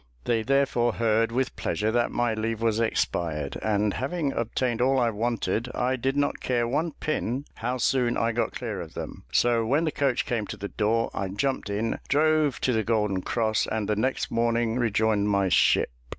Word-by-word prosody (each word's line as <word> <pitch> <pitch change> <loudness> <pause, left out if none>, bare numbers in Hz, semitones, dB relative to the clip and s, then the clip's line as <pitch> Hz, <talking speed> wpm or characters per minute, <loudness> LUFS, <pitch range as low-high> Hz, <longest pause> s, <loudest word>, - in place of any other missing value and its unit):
They 115 -2 +1
therefore 130 -2 +2
heard 115 0 +1
with 125 +2 -1
pleasure 105 +1 -1
that 120 +1 +1
my 120 -1 0
leave 110 0 -2
was 115 -1 +1
expired; 85 -9 -1
and, 105 -1 +1
having 140 +2 -2
obtained 120 +1 -1
all 135 +2 +3
I 120 -2 +2
wanted, 115 0 -1
I 125 +1 +1
did 135 +2 -1
not 145 0 0
care 120 -2 0
one 150 +6 -1
pin 140 -3 -2
how 125 +2 -2
soon 125 -1 +1
I 115 +1 +1
got 115 +1 -1
clear - - -4
of - - -10
them; - - -7
so 120 +4 +3
when 140 +8 +1
the 155 - 0
coach 135 -4 0
came 110 -4 -2
to - - -6
the 100 - -5
door, 115 +2 0
I 100 - -2
jumped 120 +4 -2
in, 105 +3 -1
drove 155 -1 +2
to 130 - +1
the 110 -1 +1
Golden 105 -3 0
Cross, 110 +1 0
and 110 -2 -2
the 105 - +1
next 130 +6 -1
morning 115 0 +1
rejoined 110 -2 +1
my 100 -2 +2
ship. 90 - +3
115 Hz, 195 wpm, -26 LUFS, 110-130 Hz, -, all